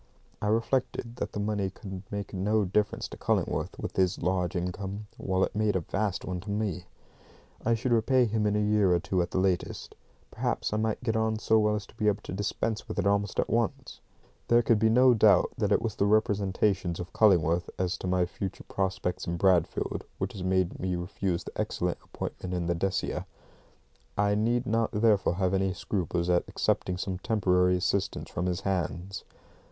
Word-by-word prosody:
I 105 - -1
reflected 115 +1 0
that - - -4
the - - -3
money 105 -2 -1
could 95 0 -8
make 100 -1 -5
no 105 +2 +1
difference 105 +3 0
to - - -9
Cullingworth, - - -1
with - - -6
his 95 -2 +2
large 90 0 0
income, 95 +3 -3
while 95 0 0
it - - -2
made 105 -1 +1
a 95 - +1
vast 100 +3 -2
one 90 -1 -3
to 100 - -9
me. 100 -4 -2 0.8
I 115 +1 +3
should 120 +3 -2
repay 125 +2 +4
him 110 -1 0
in 105 - +1
a - - +2
year 105 -3 +3
or - - +2
two 90 +2 0
at 85 - -2
the - - -3
latest. 95 -1 -1 0.4
Perhaps - - -2
I - - +1
might 110 +2 -1
get 115 -3 0
on 110 0 +1
so 110 0 +3
well 105 0 +2
as 105 -2 -4
to - - -19
be 105 -1 -1
able 105 0 +1
to - - -6
dispense 105 +3 -2
with - - -6
it - - 0
almost 100 -1 +1
at - - +2
once. - - -1 0.5
There 120 0 +5
could 115 -1 +3
be 110 +1 +4
no 125 +2 +6
doubt 105 -5 +5
that 105 -2 +1
it - - +3
was 115 -3 -1
the 100 - +1
representations 100 -4 +1
of 90 0 -7
Cullingworth 90 -5 +3
as 90 -1 0
to - - -4
my 90 -1 +2
future 95 +2 -6
prospects 95 -1 -2
in 85 0 -1
Bradfield 90 -2 +1
which - - -3
had 95 - -6
made 95 -1 +1
me 90 0 -1
refuse 90 0 -2
the - - -8
excellent - - -2
appointment 90 0 -5
in 90 -1 -1
the 85 - +1
Decia. 95 +3 -2 0.9
I 100 0 +3
need 115 +4 +1
not 115 0 +1
therefore 105 -4 +3
have 95 0 0
any 95 0 +1
scruples 90 -3 -2
at 90 -1 +3
accepting 90 -1 0
some 95 0 -3
temporary 90 -3 +2
assistance 95 +1 -1
from 90 +2 -2
his 90 +1 -1
hands. 95 0 -2
100 Hz, 200 wpm, -28 LUFS, 90-105 Hz, 0.9 s, no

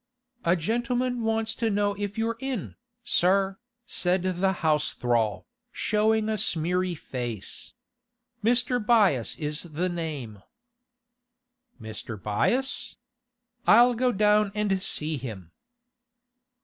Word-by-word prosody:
'A 170 +1 +4
gentleman 240 +6 -1
wants 225 0 0
to 230 - -1
know 205 0 +1
if 205 +1 -5
you're 225 0 -1
in, 265 -7 -4 0.3
sir,' 190 -1 +2 0.3
said 180 -4 +1
the 185 +1 +1
house 150 -1 +2
thrall, 115 -3 0 0.3
showing 215 0 +1
a 215 -1 0
smeary 180 +2 +1
face. 120 - -5 0.7
'Mr. 245 +1 +2
Byass 205 - +3
is 150 0 -3
the 175 +2 -2
name.' 145 - -5 1.4
'Mr. 110 -1 -7
Byass? 240 - 0 0.7
I'll 240 +3 +7
go 250 +2 +1
down 210 -1 +3
and 200 -3 0
see 155 -3 -1
him. 105 -10 -8
190 Hz, 110 wpm, -27 LUFS, 150-225 Hz, 1.4 s, I'll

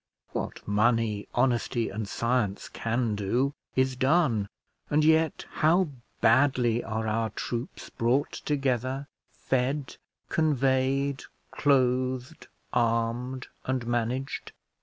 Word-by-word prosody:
What - - -5
money, 105 0 +2
honesty, 120 -1 +1
and 105 +1 -4
science 115 -3 -1
can 115 0 -1
do, 120 +7 0 0.2
is 130 0 +2
done; 130 - +2 0.4
and 150 +1 +3
yet 160 0 +3
how 170 +2 +3 0.3
badly 120 -1 +4
are 110 0 -3
our 110 +1 0
troops 120 +4 -5
brought 120 +5 +1
together, 135 -1 -1 0.2
fed, 130 +2 -2 0.3
conveyed, 135 -2 +1 0.3
clothed, 130 +1 +1 0.3
armed, 120 +2 0 0.2
and 130 -2 -1
managed. 120 +3 -2
125 Hz, 95 wpm, -28 LUFS, 115-135 Hz, 0.4 s, badly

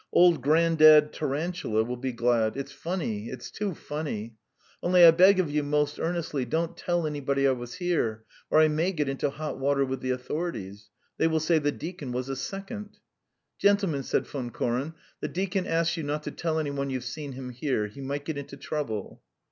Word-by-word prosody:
"Old 175 -5 +5
Grandad 155 0 +6
Tarantula 150 -6 -1
will 125 +2 -4
be 130 +1 -3
glad.... 120 -1 +1
It's 140 0 -5
funny, 140 - -3
it's 130 -2 -8
too 200 -4 -3
funny! 140 -9 -5 0.5
Only 175 0 +6
I 165 - +11
beg 185 +4 +6
of 170 -6 +1
you 150 0 +1
most 150 0 0
earnestly 165 -5 -1
don't 165 +6 -1
tell 175 -2 -1
anybody 140 -2 0
I - - +4
was 120 -1 -5
there, 155 - 0 0.3
or 155 - +5
I 155 - +7
may 160 +5 0
get 150 -4 -1
into 135 +1 -1
hot 150 +2 -5
water 140 0 +2
with 130 0 -3
the 130 - -3
authorities. 125 - -4 0.3
They - - +4
will 160 -1 +1
say: 160 +1 +3
'The 145 -1 0
deacon 160 -6 -6
was 130 +2 -3
a 135 - -2
second.'" 200 - -6 0.6
"Gentlemen," 200 -8 +3
said - - 0
Von 130 -4 -5
Koren, 125 +7 -2 0.2
"the - - -3
deacon 190 0 -2
asks 165 0 +1
you - - -2
not 150 0 -3
to - - -4
tell 160 -2 -2
any 150 -2 -1
one 140 0 -2
you've 130 -2 -3
seen 140 +2 -6
him 125 -1 -7
here. 125 -3 -1
He 105 +7 -9
might 140 +1 -4
get 155 -2 -3
into 140 0 -9
trouble." 125 -8 -4
145 Hz, 195 wpm, -27 LUFS, 130-165 Hz, 0.6 s, I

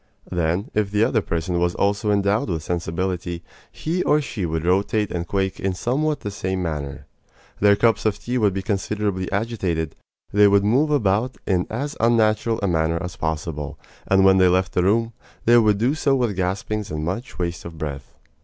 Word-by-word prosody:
Then, 90 +2 -1
if 105 -2 +1
the 105 +2 +2
other 115 -1 +2
person 85 0 -2
was 90 0 +1
also 100 +2 0
endowed 100 +1 +1
with 80 -3 -2
sensibility, 85 +1 -3 0.3
he 170 +3 -2
or 150 - +3
she 110 - -3
would 80 0 -2
rotate 100 +3 +1
and 85 -1 -3
quake 95 0 -1
in 95 -1 -1
somewhat 145 +9 -1
the 105 - -4
same 95 -2 -2
manner. 75 -5 -4 0.5
Their 100 0 +5
cups 115 0 +2
of 105 -1 0
tea 125 +1 -2
would 105 -3 +3
be 95 0 -4
considerably 100 -2 -2
agitated. 95 -7 -2 0.4
They 105 0 +6
would 100 0 +4
move 135 +9 +3
about 120 -3 +1
in 90 -3 +1
as 140 +6 -3
unnatural 115 -1 +2
a - - +2
manner 80 -1 +1
as 90 0 -6
possible; 80 -2 -3 0.3
and 95 0 +4
when 95 0 +6
they 95 - +6
left 90 0 +1
the 90 - +2
room, 115 +5 +2 0.3
they 120 +1 +7
would 105 -3 +3
do 120 +7 +2
so 140 -3 +2
with 120 -6 0
gaspings 95 +3 -2
and 75 0 -3
much 95 +3 -4
waste 85 -2 -3
of 85 -1 -9
breath. 70 -3 -6
100 Hz, 190 wpm, -22 LUFS, 85-110 Hz, 0.5 s, they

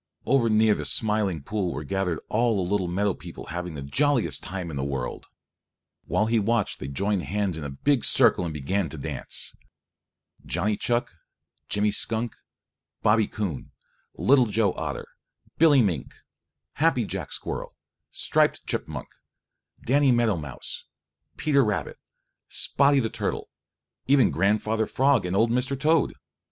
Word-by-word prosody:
Over 125 -3 +3
near 110 0 +4
the - - -3
Smiling 105 -8 +1
Pool 100 0 -2
were 75 - -5
gathered 90 +1 -2
all 115 +1 +2
the 95 -3 -1
little 100 -3 +1
meadow 100 +3 0
people - - -10
having 90 -2 -4
the 70 - -6
jolliest 135 - +1
time 90 -2 -5
in - - -6
the 70 - -2
world. 70 -3 -4 0.8
While 105 - +1
he 115 0 +2
watched 110 0 0
they 65 - -5
joined 100 +7 0
hands 100 -1 -1
in 80 - -5
a 70 - -4
big 125 - +1
circle 115 -7 +4
and 85 - -3
began 80 +5 -1
to 80 - -5
dance, 70 - -5 0.9
Johnny 100 +5 0
Chuck, 120 +3 -1 0.6
Jimmy 105 +1 +1
Skunk, 115 +2 -1 0.7
Bobby 105 0 +4
Coon, 95 -10 -4 0.5
Little 130 -3 +4
Joe 105 -2 +1
Otter, 75 -4 -4 0.5
Billy 150 -6 +6
Mink, 85 -10 -2 0.7
Happy 155 -8 +3
Jack - - -5
Squirrel, - - -4 0.3
Striped - - +1
Chipmunk, - - -4 0.8
Danny 140 +2 +4
Meadow 120 -4 +3
Mouse, 75 -4 -6 0.5
Peter 140 -3 +3
Rabbit, 105 -3 -2 0.5
Spotty 140 0 +3
the 115 -4 -1
Turtle, - - -3 0.6
even 135 -3 +5
Grandfather 105 +4 +1
Frog 135 -7 +2
and 90 - -2
old 115 +3 +3
Mr. 130 +2 0
Toad. 155 +2 +2
105 Hz, 145 wpm, -26 LUFS, 90-120 Hz, 0.9 s, Billy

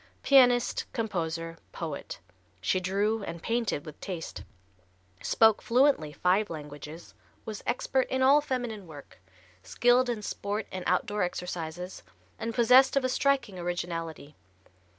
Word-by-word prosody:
Pianist, 245 -3 +4
composer, 165 -7 -3
poet, 160 -4 -6 0.4
she 95 - +1
drew 200 +4 0
and 170 -4 -7
painted 230 -10 -1
with 155 - -11
taste; 175 -5 -6 0.8
spoke 220 -1 +4
fluently 245 - +3
five 185 +6 +1
languages; 150 +1 -9 0.3
was 215 -2 -6
expert 260 +1 0
in 260 0 +1
all 280 +3 +6
feminine 245 -8 -4
work, 145 - -13 0.4
skilled 245 - +3
in 225 -3 -3
sport 205 +2 -3
and 185 -1 -5
outdoor 205 +4 0
exercises, 180 0 -4 0.4
and 230 0 -4
possessed 255 +3 +6
of 275 - +2
a - - +1
striking 265 -8 +1
originality. 165 -4 -4
200 Hz, 125 wpm, -28 LUFS, 165-245 Hz, 0.8 s, all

